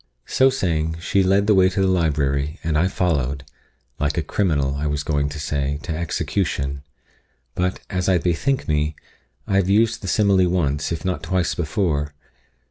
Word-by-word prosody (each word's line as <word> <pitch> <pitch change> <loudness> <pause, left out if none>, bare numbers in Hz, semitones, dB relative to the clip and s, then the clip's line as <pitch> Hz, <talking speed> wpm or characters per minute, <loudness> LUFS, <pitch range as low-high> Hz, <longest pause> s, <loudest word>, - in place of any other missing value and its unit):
So 130 0 +4
saying, 80 -10 -1
she 95 +3 +1
led 95 +2 +3
the 105 - +4
way 95 -1 +5
to 95 - -3
the 95 - +3
library, 75 -4 0
and 80 -2 -1
I 80 +4 +3
followed 70 -8 -1 0.6
like 75 +3 -1
a 85 - +1
criminal, 75 -6 0
I 70 +2 -2
was 75 0 -1
going 70 -2 0
to 75 +1 -7
say, 70 -1 -1
to 80 -2 -3
execution; 70 -4 -2 0.7
but, 90 +1 -1
as 90 0 -1
I 95 - +4
bethink 90 +11 0
me, 75 0 0 0.5
I 95 - +1
have 95 -1 +2
used 110 +3 +2
the 95 - -6
simile 95 -2 +3
once, 75 -5 0
if 85 +2 -4
not 90 -1 -1
twice 90 -2 0
before. 75 -4 -1
85 Hz, 175 wpm, -22 LUFS, 75-95 Hz, 0.7 s, way